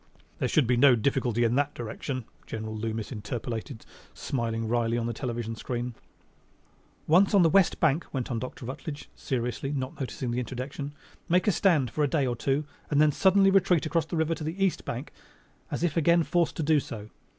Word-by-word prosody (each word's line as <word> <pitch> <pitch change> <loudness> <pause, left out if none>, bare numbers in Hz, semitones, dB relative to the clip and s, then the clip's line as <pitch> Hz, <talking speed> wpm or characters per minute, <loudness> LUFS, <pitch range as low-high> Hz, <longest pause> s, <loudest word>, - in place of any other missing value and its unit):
"There - - +1
should 150 - +3
be 125 +1 +2
no 130 0 +7
difficulty 120 -1 +1
in 115 0 +2
that 145 0 0
direction," 125 +2 -5 0.2
General 110 0 -5
Loomis 110 +1 -3
interpolated, 115 +2 -5 0.3
smiling 115 -3 -2
wryly 115 0 +1
on 115 - -1
the 120 - -2
television 115 -2 -4
screen. 120 +2 -4 1.1
"Once 190 +6 +4
on 195 - +7
the 165 - +4
west 195 -2 +4
bank," 160 +1 +2
went 130 -2 -3
on 115 - -1
Dr. 125 0 -7
Rutledge 145 +3 -7
seriously, 125 +2 -3
not 130 -2 -4
noticing 130 -2 -3
the 120 - -1
interjection, 130 +3 -5 0.4
"make 180 +2 +3
a - - +6
stand 160 - +2
for 150 - 0
a - - +3
day 140 0 +1
or 120 -2 -1
two 135 +5 0 0.2
and 145 - +2
then 150 0 +5
suddenly 195 +4 +4
retreat 185 -4 +3
across 160 0 0
the 170 - -3
river 160 +1 +1
to 160 - -6
the 175 +6 0
east 190 - -1
bank 125 +5 -5 0.6
as - - -3
if 170 -4 +1
again 170 +1 +4
forced 170 0 +1
to 160 - -2
do 155 0 +4
so. 110 -5 -8
135 Hz, 195 wpm, -28 LUFS, 120-160 Hz, 1.1 s, no